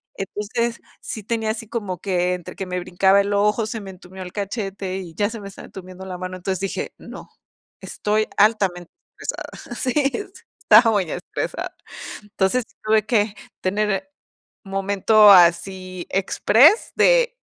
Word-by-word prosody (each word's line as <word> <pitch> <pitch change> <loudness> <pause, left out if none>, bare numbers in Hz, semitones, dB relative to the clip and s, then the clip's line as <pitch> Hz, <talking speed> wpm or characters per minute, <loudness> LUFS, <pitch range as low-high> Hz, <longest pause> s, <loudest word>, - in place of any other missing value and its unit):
Entonces, 225 +4 -3 0.2
sí 220 - -6
tenía 225 0 -1
así 225 0 -6
como 205 -6 -4
que, 180 -2 0
entre 175 - -9
que 195 - -5
me 180 0 -2
brincaba 190 +3 +3
el 200 +1 -2
ojo, 210 +2 +2
se 220 0 -5
me 195 - -9
entumió 185 +1 -12
el 180 -1 -7
cachete, 195 -2 -4
y 175 -4 -8
ya 205 +1 +1
se 230 - -7
me 200 - -8
estaba 195 - -11
entumiendo 185 0 -10
la 180 -1 -6
mano, 185 0 -5
entonces 190 +1 -3
dije: 195 -1 -4
"No, - - -11 0.5
estoy 215 +1 -1
altamente 195 -5 +2 0.3
estresada". 240 - -6
Sí, 255 +1 -2 0.7
estaba 225 +1 +6
muy 190 -6 0
estresada 180 - -5 0.5
Entonces, 205 +3 0 0.2
tuve 215 0 +2
que 210 -3 +1 0.3
tener 210 +7 -1 0.9
momento 210 +1 +6
así 185 0 +3
express 235 - +4
de - - +4
200 Hz, 150 wpm, -22 LUFS, 185-220 Hz, 0.9 s, estaba